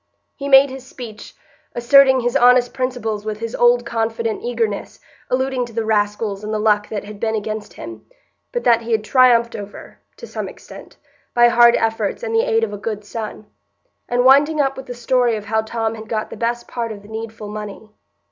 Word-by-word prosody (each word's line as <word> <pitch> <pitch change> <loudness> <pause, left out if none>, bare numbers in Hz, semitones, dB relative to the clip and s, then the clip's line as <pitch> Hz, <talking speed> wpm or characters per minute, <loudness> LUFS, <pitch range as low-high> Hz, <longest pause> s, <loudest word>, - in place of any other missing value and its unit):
He 280 0 -5
made 270 0 +7
his 265 -1 -8
speech, 240 -5 -10 0.4
asserting 265 +2 +5
his 240 0 -1
honest 245 0 +5
principles 245 -5 -3
with 215 -1 -4
his 230 0 -5
old 240 0 +3
confident 225 -1 -2
eagerness, 230 -4 -3 0.3
alluding 260 0 0
to 235 - -14
the 225 0 -2
rascals 210 -1 -1
and 215 - -4
the 215 - 0
luck 210 -1 +1
that 210 - -4
had 205 0 -10
been 220 0 -1
against 215 0 -5
him, 345 +2 -9 0.5
but 485 -1 -3
that 230 -1 +4
he 230 0 -3
had 220 -1 +1
triumphed 235 -1 +4
over, 205 0 -10 0.2
to - - -9
some - - -5
extent, - - -13 0.4
by 240 0 +6
hard 235 0 +6
efforts 225 - -1
and 455 -2 -3
the 455 - +4
aid 450 -1 +2
of - - -2
a 205 - -6
good 210 -1 -5
son; 215 0 -6 0.6
and 245 +1 +1
winding 290 +4 +5
up 270 -1 +1
with 265 - -9
the 245 - -6
story 245 -1 +1
of 210 -1 -6
how 220 +1 0
Tom 225 0 -3
had 220 -1 -10
got 215 -1 -3
the - - -6
best 235 +2 -2
part 230 -2 -4
of 205 -2 -9
the - - -14
needful 220 0 -7
money. 210 0 -8
230 Hz, 205 wpm, -20 LUFS, 215-250 Hz, 0.6 s, made